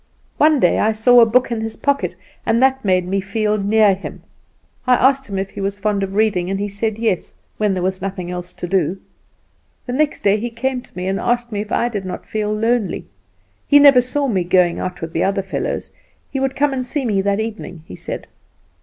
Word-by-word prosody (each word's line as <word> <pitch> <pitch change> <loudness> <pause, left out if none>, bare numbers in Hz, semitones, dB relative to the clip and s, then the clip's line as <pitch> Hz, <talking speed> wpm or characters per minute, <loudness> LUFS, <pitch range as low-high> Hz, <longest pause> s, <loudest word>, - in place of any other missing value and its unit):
One 305 -1 +5
day 175 - +3
I 220 +1 +2
saw 245 +3 +5
a 230 - +6
book 245 +2 +2
in 230 -1 -1
his 220 0 -4
pocket, 280 -1 -1 0.3
and 225 +1 +2
that 265 +1 +3
made 185 -3 +2
me 195 +1 0
feel 210 +2 -1
near 205 0 +4
him. 190 - -8 0.6
I 250 - +6
asked 270 +1 +2
him 195 - -3
if 195 0 -3
he - - -7
was 195 +1 -2
fond 205 -1 0
of 195 0 -3
reading, 200 -5 +1
and 195 0 -2
he 205 - -1
said, 210 +2 -2
yes, 220 -6 -1 0.2
when 210 -3 +1
there 180 - -2
was 185 +1 -1
nothing 185 -2 -4
else 180 0 -6
to 175 - -6
do. 190 0 0 0.9
The 245 - -4
next 295 +2 0
day 200 +1 +3
he 240 +3 -3
came 250 +2 -2
to 215 - -19
me, 180 - -3
and 195 +1 -1
asked 240 0 0
me 205 -1 -2
if 210 +1 -8
I 240 - +1
did 205 -5 -4
not 185 - -6
feel 210 -1 -2
lonely; 225 0 0 0.6
he 285 - +6
never 280 -3 +8
saw 275 +3 -1
me 195 -7 +1
going 175 -1 +2
out 180 -1 -4
with 165 0 -5
the - - +1
other 195 0 0
fellows; 190 - -3 0.4
he 270 - -2
would 270 0 -1
come 285 0 +1
and 255 -1 -2
see 265 +2 -3
me 205 -4 +1
that 200 +1 0
evening, 210 -7 -5
he - - -9
said. - - -6
210 Hz, 230 wpm, -19 LUFS, 195-245 Hz, 0.9 s, never